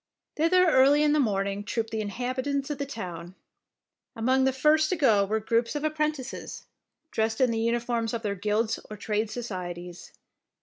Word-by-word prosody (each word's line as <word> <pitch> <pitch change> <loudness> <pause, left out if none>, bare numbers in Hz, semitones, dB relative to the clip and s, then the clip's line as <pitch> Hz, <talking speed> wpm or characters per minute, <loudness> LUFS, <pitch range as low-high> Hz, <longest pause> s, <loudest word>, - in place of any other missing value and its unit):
Thither 360 +4 +4
early 285 0 +5
in 295 -1 +3
the 305 - +3
morning 200 -4 0
trooped 225 +1 -3
the 220 -1 -2
inhabitants 260 +6 -2
of 290 - -4
the 280 - -3
town. 180 -8 -7 0.8
Among 260 +3 +2
the 265 - +3
first 305 +4 +3
to 370 - +1
go 225 - +4
were 220 +2 0
groups 230 +4 0
of 295 - -2
appren 305 0 +1
tices, 265 -3 -8 0.5
dressed 220 0 -1
in 255 -3 +3
the 225 - -1
uniforms 235 0 0
of 230 - -5
their 205 -2 -1
guilds 210 +3 -1
or 215 - -7
trade 210 +1 -1
societies. 180 -6 -6
230 Hz, 175 wpm, -27 LUFS, 210-275 Hz, 0.8 s, early